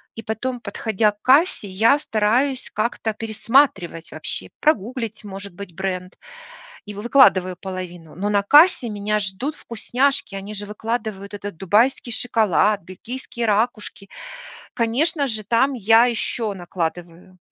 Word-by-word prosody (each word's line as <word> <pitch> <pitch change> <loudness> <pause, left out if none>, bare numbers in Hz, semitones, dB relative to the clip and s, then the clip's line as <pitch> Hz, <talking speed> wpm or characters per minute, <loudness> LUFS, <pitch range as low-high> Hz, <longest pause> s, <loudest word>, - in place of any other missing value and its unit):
и 225 - -7
потом, 240 +4 -3
подходя 215 0 0
к 210 - -37
кассе, 270 - +3
я 220 +9 +4
стараюсь 250 +2 0
как-то 220 0 -1
пересматривать 220 - +1
вообще, - - -4
прогуглить, 230 -5 -1
может 195 -1 -8
быть, 190 -2 -10
бренд, 185 0 -4 0.7
и 205 - -7
вы 205 - -7
выкладываю 190 -8 +4
половину. 180 -4 -7
Но 200 +3 -2
на 205 -1 +2
кассе 295 - +6
меня 210 0 -1
ждут 210 +10 -3
вкусняшки, 245 -1 -1
они 200 +2 -7
же 205 - -5
выкладывают 210 -2 -4
этот 205 -3 -7
дубайский 225 +7 +1
шоколад, 215 -4 +2
бельгийские 235 +6 -6
ракушки. 210 -2 -1 0.7
Конечно 280 +6 +1
же, 220 -3 -3
там 235 +7 +2
я 225 +1 +5
еще 230 -2 -2
накладываю. 175 0 -6
215 Hz, 130 wpm, -21 LUFS, 195-240 Hz, 0.7 s, кассе